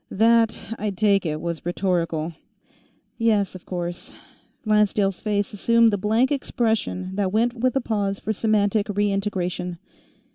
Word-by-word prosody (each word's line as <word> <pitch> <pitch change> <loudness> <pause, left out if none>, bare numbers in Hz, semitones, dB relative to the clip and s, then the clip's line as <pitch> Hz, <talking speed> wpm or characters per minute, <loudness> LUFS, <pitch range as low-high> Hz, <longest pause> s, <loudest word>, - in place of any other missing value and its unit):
"That, 225 +1 +2
I 210 - -1
take 200 -2 +2
it, 155 0 -2
was 170 -1 -4
rhetorical." 170 -3 -1 0.9
"Yes, 215 -4 +2
of 185 - -12
course." 175 -1 -5 0.5
Lancedale's 210 -3 +2
face 205 -2 -1
assumed 230 +2 +3
the - - +2
blank 225 +7 +2
expression 220 -8 -1
that 195 -2 0
went 230 +3 +2
with 255 +1 0
a 270 - +2
pause 200 -4 -1
for 220 - -2
semantic 210 -1 +1
re 205 0 +1
integration. 180 -3 -2
205 Hz, 140 wpm, -23 LUFS, 185-220 Hz, 0.9 s, assumed